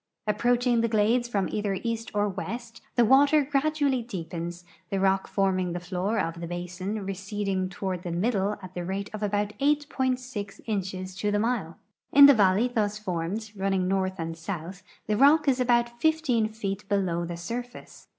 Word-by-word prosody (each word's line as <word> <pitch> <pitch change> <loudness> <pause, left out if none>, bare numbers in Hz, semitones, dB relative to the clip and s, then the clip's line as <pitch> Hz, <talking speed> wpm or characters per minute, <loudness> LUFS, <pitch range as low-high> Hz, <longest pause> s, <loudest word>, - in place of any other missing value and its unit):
Approaching 240 +3 +2
the 230 - +2
glades 225 +3 +2
from 200 -5 0
either 205 -2 -1
east 230 -1 -2
or 205 0 +2
west, 230 +4 -6
the 240 - +5
water 285 +5 +5
gradually 280 -2 +1
dee])ens, 175 -4 -6 0.3
the 195 -2 -1
rock 190 0 +2
forming 185 -3 0
the 175 - -3
floor 185 +5 -2
of 170 -4 -2
the 170 - -4
basin 180 +4 -4
re 195 - -2
ceding 195 -1 -2
toward 185 -1 -4
the 180 - -5
middle 200 +2 0
at 185 0 -9
the 180 - -4
rate 195 +3 -4
of 215 - -5
about 205 0 0
8.6 260 -7 -1
inches 190 -3 -3
to 210 - 0
the 205 - +1
mile. 210 -7 -1 0.3
In 280 +1 +10
the 280 - +9
valley 205 +1 +4
thus 210 -4 -1
formed, 200 +2 -3
running 195 -1 0
north 190 0 0
and 165 -1 -4
south, 175 +2 -6 0.2
the 210 - 0
rock 300 +4 +5
is 265 -2 +3
about 240 -1 +1
15 315 -9 +2
feet 205 -2 -5
below 185 -4 0
the 170 0 -5
surface. 240 +8 -7
205 Hz, 175 wpm, -27 LUFS, 185-240 Hz, 0.3 s, In